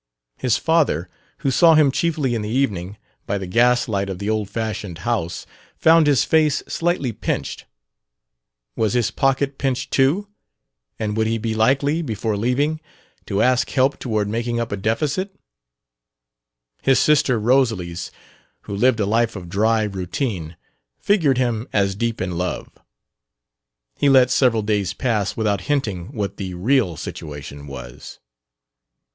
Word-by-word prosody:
His 125 -4 +1
father, 145 - +1 0.3
who 135 - +3
saw 165 +3 +6
him 150 -3 +5
chiefly 150 -4 0
in 115 - -1
the 105 - -4
evening, 105 -6 -1 0.3
by 100 - 0
the 95 - -5
gas 120 +6 +3
light 100 -3 -1
of 95 - -4
the 100 +3 -2
old 105 -2 -1
fashioned 105 -6 -4
house, 105 -8 -2 0.3
found 160 -1 +5
his 145 -3 +4
face 155 -2 +2
slightly 165 -7 -1
pinched: - - -4 1.1
was 110 -3 0
his 120 -2 +1
pocket 135 +1 0
pinched 130 -2 -2
too, 150 +10 +2 0.7
and 105 -1 -2
would 110 0 +1
he 115 +1 0
be 115 0 -2
likely, 140 +8 +2
before 110 - -2
leaving, 140 +9 0 0.5
to 100 +2 +1
ask 125 0 +2
help 135 +1 +1
toward 110 -4 -1
making 115 +2 -2
up 115 -1 -3
a - - 0
deficit? 140 - -1 1.5
His 135 -2 +3
sister 140 -4 +3
Rosalys, 105 -8 +1 0.5
who 100 - -6
lived 120 +2 +3
a 105 - +1
life 115 +2 +1
of 90 -3 -8
dry 110 +4 +2
routine, 95 - -3 0.4
figured 160 -11 +2
him 120 -2 -1
as 100 -2 +1
deep 115 +3 -2
in 90 -2 -3
love. 90 0 -3 1.3
He 140 - +4
let 130 -2 +5
several 115 -5 +3
days 100 -3 0
pass 105 -6 -1
without 105 -4 0
hinting 105 -12 -1
what 100 -2 -4
the 95 -2 -5
real 105 - +1
situation 70 -1 -8
was. 65 -3 -9
115 Hz, 145 wpm, -21 LUFS, 100-135 Hz, 1.5 s, saw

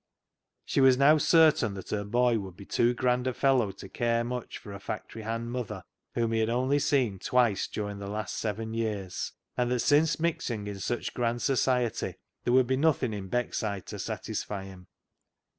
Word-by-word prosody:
She - - +1
was 130 -1 +6
now 150 +3 +6
certain 155 - +4
that 95 - -8
her 105 -1 -1
boy 120 +2 +2
would 95 -3 -8
be 100 - -10
too 120 +4 +2
grand 125 0 +1
a 130 - -1
fellow 130 -7 +3
to 95 - -10
care 115 +3 0
much 125 0 -4
for 100 - -10
a 100 - -7
factory 110 +2 -6
hand 115 +2 -3
mother, 125 -4 -4 0.3
whom 115 -1 +1
he 115 - +1
had 110 0 +1
only 130 +4 +2
seen 130 -9 +1
twice 120 -4 +2
during 105 -1 -4
the 100 0 -6
last 105 +1 -3
seven 110 +1 -3
years, 105 -5 -3 0.2
and 125 -1 +1
that 125 -1 +1
since 150 +2 +3
mixing 125 -10 -1
in 100 -1 -5
such 120 +5 -2
grand 120 -1 -1
society 125 -3 +1 0.3
there 120 - +2
would 130 0 +6
be 130 +2 0
nothing 140 -6 +2
in 100 -2 -6
Beckside 105 -4 -2
to - - -7
satisfy 100 -2 -4
him. 95 -2 -12
115 Hz, 190 wpm, -29 LUFS, 105-125 Hz, 0.3 s, was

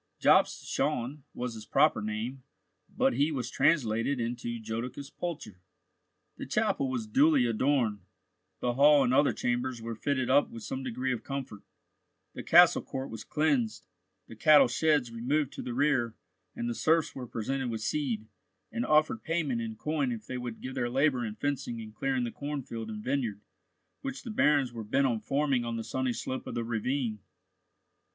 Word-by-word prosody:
Jobst - - +4
Schön 130 +5 -1
was 125 -1 -3
his 110 -1 -10
proper - - +3
name, 110 +5 -4 0.5
but - - +1
he 145 +6 +2
was 125 -3 -3
translated 125 -2 +2
into 120 0 -3
Jodocus 120 +5 -5
Pulcher. 145 - -6 0.8
The - - -6
chapel 135 - +1
was 125 -4 -2
duly 140 +4 +4
adorned, 120 -2 +1 0.6
the 120 -1 +1
hall 145 +2 +6
and 125 -1 +1
other 140 +2 +4
chambers 125 0 -1
were 115 0 -5
fitted 130 +2 -1
up 140 +2 +4
with 115 -1 -9
some 130 - -4
degree 130 0 -2
of 120 - -5
comfort; 135 -7 -5 0.7
the - - -6
castle - - +6
court 135 -2 -6
was 110 -1 -7
cleansed, 145 -8 0 0.4
the - - -12
cattle 150 +7 +6
sheds 145 -1 +1
removed 135 +5 -1
to - - -6
the 120 - -5
rear, 130 -5 +1 0.4
and 120 - -3
the 120 - -1
serfs 160 +6 +2
were 125 -2 -7
presented 130 +3 -2
with 110 -2 -4
seed, 120 -5 -1 0.5
and 235 +1 -2
offered 155 +7 +3
payment 155 -8 -1
in 110 -1 -4
coin 145 +1 -1
if 110 -2 -5
they 130 +2 -5
would 120 -2 -6
give 130 - -5
their 120 -2 -1
labour 130 0 +2
in 110 -2 -4
fencing 135 -4 -2
and 110 -1 -9
clearing 130 +2 -1
the 120 - -3
cornfield 130 -6 -5
and 105 -1 -6
vineyard 125 -6 -1 0.6
which 270 -1 -5
the 235 - -6
barons 145 - +3
were 115 -1 -5
bent 135 +6 +1
on 120 -4 +1
forming 140 -1 0
on 115 -1 -3
the 115 - -3
sunny 130 +2 -1
slope 130 +2 -4
of - - -5
the 120 - -1
ravine. 115 0 -2
125 Hz, 175 wpm, -29 LUFS, 115-140 Hz, 0.8 s, hall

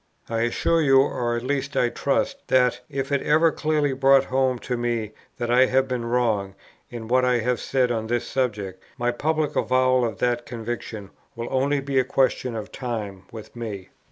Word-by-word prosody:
I 115 0 -1
assure 160 +8 +1
you, 135 -3 +5
or 120 -3 0
at 120 - -3
least 135 +1 -2
I 120 - +3
trust, - - -1
that, 125 -1 +3
if 135 -1 -3
it 140 - +1
is - - -7
ever 160 +2 +4
clearly 150 -3 0
brought 135 0 +5
home 130 -1 +1
to 125 +1 -3
me 120 -3 -2 0.3
that 120 -1 -2
I 130 +1 +5
have 130 +1 +2
been 125 -2 -3
wrong 110 -5 0 0.3
in 115 -2 -7
what 125 +2 +3
I 125 -1 +3
have 125 +1 0
said 130 -2 +1
on 110 -2 -2
this 120 0 -1
subject, 105 -8 -2 0.2
my 120 -1 0
public 155 +4 -1
avowal 130 0 +2
of 110 -4 -2
that 120 -1 -1
conviction 115 -3 -6 0.2
will 115 0 -5
only 140 +2 +1
be 135 -1 0
a - - +3
question 130 -1 0
of 105 -2 -6
time 105 -7 -5
with 110 0 -10
me. 105 -5 -6
125 Hz, 195 wpm, -24 LUFS, 115-135 Hz, 0.3 s, you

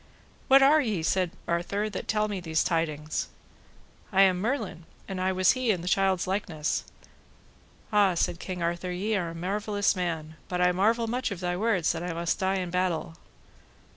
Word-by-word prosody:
What 270 0 +7
are 300 +3 +6
ye, 210 - -1
said 185 +1 +1 0.2
Arthur, 180 +5 -1
that 205 - -6
tell 215 -1 +1
me 205 -2 -3
these 160 -2 0
tidings? 155 -2 -1 0.8
I 195 -1 +6
am 185 -2 +3
Merlin, 210 - -2 0.2
and 190 -2 -4
I 185 0 +1
was 185 0 +4
he 255 -2 -1
in 185 -5 +2
the 175 - -7
child's 190 -1 +2
likeness. 180 -5 -2 1.1
Ah, 200 -3 +4
said 170 0 0
King 180 -2 -5
Arthur, 175 +2 -2
ye 205 +5 -1
are 175 -4 -1
a 165 - -8
marvellous 205 +4 0
man, 160 -3 -3
but 180 - -2
I 180 0 +4
marvel 220 +6 +2
much 245 +3 -1
of 200 -4 -5
thy 180 -1 -1
words 195 -3 +1
that 165 - -4
I 175 -1 -3
must 170 0 -1
die 190 0 +1
in 180 -2 -3
battle. 180 -3 -1
185 Hz, 185 wpm, -27 LUFS, 170-205 Hz, 1.1 s, What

